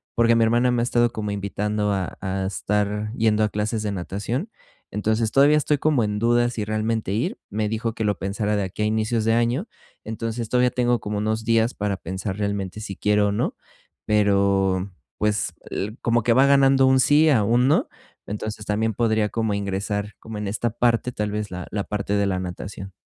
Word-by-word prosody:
porque 115 0 +4
mi 115 - +4
hermana 120 +2 +3
me 120 -1 +1
ha - - +1
estado 120 -1 +2
como 105 -1 -3
invitando 105 +1 -1
a 95 -3 -3
a 95 -1 -2
estar 105 +2 -1
yendo 110 -1 +2
a 105 - +2
clases 105 +1 -2
de 105 - -1
natación, 105 - -3 0.4
entonces, 110 +1 0
todavía 145 +2 +5
estoy 150 -1 +1
como 150 -7 +2
en 105 0 -2
duda 120 +1 +3
si 110 -3 -3
realmente 110 -1 -1
ir, 110 - -1
me 105 +1 -1
dijo 110 +1 -2
que 110 - -2
lo 105 -2 0
pensara 105 +2 -1
de 100 - 0
aquí 95 +3 -4
a - - +2
inicios 110 +1 0
de 115 - +3
año, 120 - +1 0.4
entonces, 115 +1 -4
todavía 125 0 +3
tengo 120 -2 +1
como 105 0 -3
unos 110 +1 -1
días 115 +1 +2
para 100 -1 -2
pensar 95 +3 -5
realmente 100 -1 -3
si 100 -3 -6
quiero 105 0 +2
o - - -1
no, 105 - -1 0.5
pero 100 -2 +2 0.3
pues, 105 0 0 0.2
l 105 +4 -3
como 115 -1 +1
que 120 - +3
va 130 +3 +5
ganando 135 -1 +5
un 130 0 +4
sí 155 +3 +5
a 115 -8 +4
un 120 +4 +3
no, 145 - +2 0.4
entonces, 105 +1 -5
también 110 +1 0
podría 110 -1 +1
como 110 -1 -1
ingresar 100 +1 -3
como 110 -1 -8
en 105 - -3
esta 110 +4 -1
parte, 120 +1 +1
tal 105 -2 -3
vez, 105 -1 -3
la 90 0 -6
la 100 -1 -2
parte 100 -1 -3
de 100 -1 +2
la 95 -1 -1
natación. 95 +1 -7
105 Hz, 205 wpm, -23 LUFS, 100-115 Hz, 0.5 s, todavía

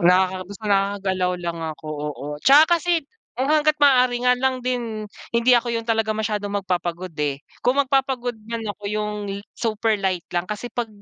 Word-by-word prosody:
Nakaka 185 +1 +4
gus 200 - -9
nakakagalaw 195 -2 +1
lang 170 -1 -3 0.2
ako, 155 - -11
oo. 150 -1 -5
'Tsaka 310 - +6
kasi 335 -1 0 0.3
kung 260 +4 -2
hangga't 305 0 +3
maaari 250 -3 +5
nga 250 0 +5
lang 260 0 0
din 235 -4 -2 0.3
hindi 235 +2 +3
ako 235 0 0
'yun 230 -1 -2
talaga 225 -1 +2
masyadong 205 -2 -1
magpapagod, 180 -1 -3
eh, 145 -2 -1 0.2
kung 260 +3 +4
magpapagod 260 -3 0
man 230 +1 -4
ako, 205 0 -7
'yung 210 0 -1 0.2
li 195 0 -4 0.2
super 220 -1 0
light 185 -3 -1
lang. 175 0 0
Kasi 210 +3 -4
'pag 240 -2 -2
220 Hz, 175 wpm, -23 LUFS, 190-250 Hz, 0.3 s, Tsaka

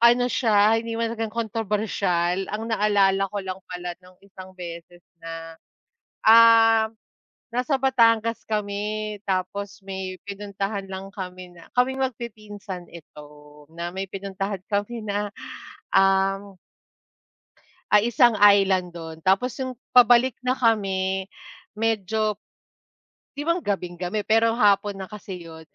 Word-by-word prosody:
ano 240 +1 +6
siya, 215 -2 +3
hindi 230 0 -3
naman 230 0 -1
talagang 220 -1 -3
kontrobersyal 205 -5 -1
ang 220 +2 -4
naalala 200 -2 +2
ko 205 - -2
lang 190 -1 -5
pala 180 -1 -6
no'ng 185 0 -18
isang 190 -1 -12
beses 175 -1 -9 0.2
na, 165 0 -7 0.7
ah, 225 0 +7 0.6
nasa 255 +3 0
Batangas 230 -4 +3
kami 210 0 -2
tapos 195 +1 -3
may 190 -1 -5
pinuntahan 200 0 -4
lang 190 +1 -7
kami 180 -2 -8
na 170 -1 -16
kaming 265 +2 +2
magpipinsan 210 -6 -6
ito 150 -3 -12 0.5
na 170 +1 -6
may 190 - -2
pinuntahan 195 0 -4
kami 210 +3 -2
na, 205 0 -2 0.6
ah 195 0 +3 1.5
ay, 210 +3 +4
isang 240 -3 +5
island 195 -3 +4
do'n. 160 -1 -9
Tapos 230 +7 +2
yung 260 - -4 0.2
pabalik 245 0 +6
na 255 - +1
kami, 195 -6 +1 0.5
medyo 215 -1 -1 1.0
Di 290 - -4
ba 335 - +3
gabing-gabi 180 +1 -3
pero 225 +1 +4
hapon 205 -2 +3
na 190 - -6
kasi 190 -4 -9
'yon, 160 -1 -11
205 Hz, 120 wpm, -24 LUFS, 190-225 Hz, 1.5 s, ah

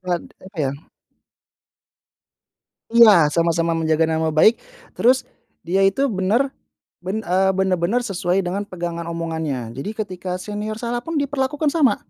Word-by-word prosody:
Klad 180 -2 -2 0.2
apa 190 -1 -13
ya 135 - 0 2.2
Iya, 205 -10 +7
sama-sama 170 0 +1
menjaga 160 0 +1
nama 160 0 0
baik, 160 +9 +4 0.3
terus 255 +2 +2 0.4
dia 185 +3 +1
itu 270 +8 0
benar, 215 +9 +1 0.5
ben 200 +5 -4
eee, 190 +2 +2
benar-benar 190 +5 +1
sesuai 185 -2 -1
dengan 200 +3 -3
pegangan 170 -2 -5
omongannya. 160 -8 -4
Jadi 135 - -5
ketika 185 -1 -5
senior 210 +3 -5
salah 240 +1 -3
pun 330 +6 -5
diperlakukan 285 +1 -1
sama. 275 -11 +3
185 Hz, 130 wpm, -21 LUFS, 170-225 Hz, 2.2 s, Iya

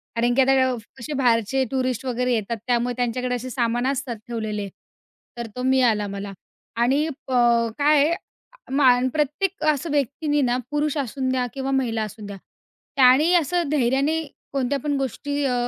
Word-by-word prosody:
कारण 240 +1 +2
की 270 - +5
आता 265 +1 +4 0.2
अव 255 - -1 0.2
कसे 265 +4 -6
बाहेरचे 250 -1 +2
टुरिस्ट 255 -2 -1
वगैरे 250 0 0
येतात 230 0 -2
त्यामुळे 245 0 +1
त्यांच्याकडे 250 +1 -1
असे 250 +1 -5
सामान 240 +1 0
असतात 270 -3 -2
ठेवलेले. 215 -3 -3 0.7
तर 235 - -4
तो 250 - -4
मिळाला 245 -5 +2
मला 200 0 -6 0.5
आणि 275 +6 +2 0.2
प 265 - -6 0.5
काय 290 0 +4
आहे 335 - +1 0.6
मा 260 -3 +5 0.2
प्रत्येक 315 +6 -1
असं 295 +3 -5
व्यक्तींनी 290 +1 0
ना, 245 -2 +1
पुरुष 295 0 0
असूद्या 260 -1 -1
किंवा 270 0 -3
महिला 235 -5 0
असूद्या, 205 -1 -8 0.6
त्याने 275 +5 +5
असं 345 -1 +1
धैर्याने 280 +3 +1 0.3
कोणत्या 275 0 0
पण 290 +1 -1
गोष्टी 285 +2 -2
अ, 260 - +1
260 Hz, 155 wpm, -23 LUFS, 240-285 Hz, 0.7 s, की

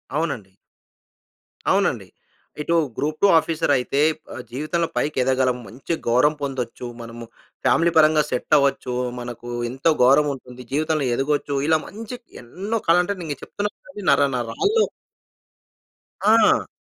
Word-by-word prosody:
అవునండి. 140 - -2 1.2
అవునండి. - - +1 0.5
ఇటు 170 +3 0 0.2
గ్రూప్-2 155 +7 +1
ఆఫీసర్ 160 -1 -1
అయితే 130 +3 -1 0.3
ఆహ్, 130 - -6
జీవితంలో 155 +5 -1
పైకి 150 - -1
ఎదగగలం. 130 -1 +1
మంచి 130 - -5
గౌరవం 130 +6 +4
పొందొచ్చు. 125 -2 -4
మనము 115 0 -8 0.4
ఫ్యామిలీ 165 +7 +4
పరంగా 155 -1 +5
సెట్ 125 +4 -2
అవ్వొచ్చు. 135 -3 0 0.2
మనకు 120 0 -7 0.2
ఎంతో 135 +6 +1
గౌరవం 145 +3 +5
ఉంటుంది. 125 -1 -12
జీవితంలో 155 -1 +1
ఎదగొచ్చు. 145 +1 -1
ఇలా 160 -1 +4
మంచి 225 +4 -7 0.3
ఎన్నో 200 - -3
కల 165 +1 +6
అంటే 200 +3 -2
నేను 150 -4 -4
చెప్తున్నా 205 0 -3 0.2
కదా 210 -8 -9
నరనరాల్లో 140 - +2 1.4
ఆ! 225 +2 +5
145 Hz, 120 wpm, -22 LUFS, 125-165 Hz, 1.4 s, కల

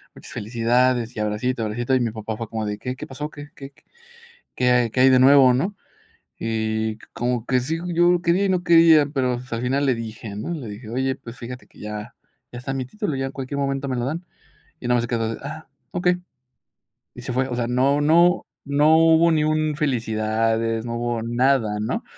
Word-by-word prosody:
muchas - - -12
felicidades 120 +2 +1
y - - -2
abracito, 110 +3 -1
abracito". 120 +4 -1
Y - - +3
mi 115 -2 0
papá, 110 0 -5
fue 115 0 -5
como 110 -1 -3
de: 105 0 -3
"¿Qué 125 0 -4
qué - - -7
pasó? 145 +3 -6
¿Qué 145 0 -10
qué 135 0 -10 0.8
qué 125 0 +2
hay 125 -2 +2
qué 125 - -1
hay 130 +1 +7
de 130 - +6
nuevo?", 135 -1 +7
¿no?, 185 +11 -1 0.6
y 110 -1 -2
co - - -18
como 120 -1 -2
que 130 -1 +2
sí, 155 +6 -2 0.2
yo 175 +1 +4
quería 175 +3 +2
y - - 0
no 180 -1 0
quería, 165 -4 +6
pero, 130 -4 -1
pues, 125 0 -13
al 115 0 -2
final 135 +3 +1
le 130 - +3
dije, 110 -2 -7
¿no?, 105 - -5
le 135 -8 -6
dije: 105 +2 -9
"Oye, 130 +2 0
pues 115 0 -11
fíjate 125 +1 -8
que - - -22
ya 105 +2 -7 0.4
ya 120 - -7
está 135 +2 -4
mi 130 -1 -2
título, 205 - -3
ya 135 0 -2
en 135 - -6
cualquier 135 +1 -5
momento 135 0 -1
me 130 - -2
lo 120 - -1
dan", 165 +5 -4 0.6
y 120 - -6
nada 125 - +3
más 120 - +1
se - - -3
quedó 115 -1 -1
de: - - -13
"Ah, 155 +3 -7 0.2
okey". 180 0 +1 1.0
Y 125 - -9
se 125 - -4
fue, 130 +1 0
o 120 - -3
sea, 120 -1 -1
no 130 +4 +2
no 170 +4 +4 0.2
no 150 +3 +4
hubo 165 +1 +5
ni 155 -1 +2
un 155 -1 0
felicidades, 115 -4 0
no 115 -1 -4
hubo 120 -1 -2
nada, 120 -2 +1
¿no?, 110 - -2
125 Hz, 220 wpm, -22 LUFS, 115-145 Hz, 1.0 s, hay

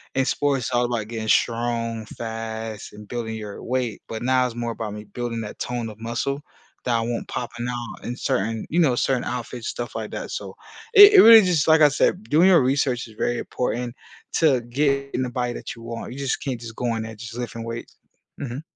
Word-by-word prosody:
in 135 - +3
sports, 140 -5 0
it's - - -5
all 120 0 +3
about 120 -3 -2
getting 110 -2 -4
strong, 115 -1 +1
fast, 110 -2 -5
and 105 0 -12
building 115 -1 -4
your 105 -2 -7
weight, 125 -4 -2
but 110 0 -5
now 130 0 +3
it's 120 - -8
more 120 0 -2
about 110 -2 -5
me 105 0 -7
building 115 +2 -4
that 105 - -8
tone 120 -2 -3
of 105 0 -12
muscle 120 +5 -2 0.4
that 120 - +2
I - - 0
want 115 +1 -3
popping 120 0 -4
out 120 -2 -6
in 120 - -3
certain 110 +1 -1
you 170 - +1
know, 145 -8 +4
certain 130 0 +1
outfits, 120 -1 -5
stuff 120 0 -5
like - - -4
that. - - -5
So, - - -6 0.4
it 410 -1 +10
it - - +11
really 225 0 +10
just 175 -5 +2
like 160 0 +6
I 150 - +8
said, 180 +7 +1
doing 165 +5 +5
your 180 -5 +6
research 130 -2 +1
is 110 - -15
very 120 +2 0
important 125 -1 -3 0.4
to 140 -6 +4
get 140 +3 0
in 130 - 0
the 125 - -2
body 125 -1 -1
that - - -7
you 115 - -13
want. 115 +1 -6
You 135 - -8
just 140 -2 -1
can't 130 -4 -3
just 115 -1 -8
go 120 -2 0
in 110 - -3
there, 110 0 -7
just 115 +1 -9
lifting 115 -1 -5
weights. 115 0 -7 0.4
Mhm. 135 0 -4
120 Hz, 225 wpm, -23 LUFS, 115-130 Hz, 0.4 s, it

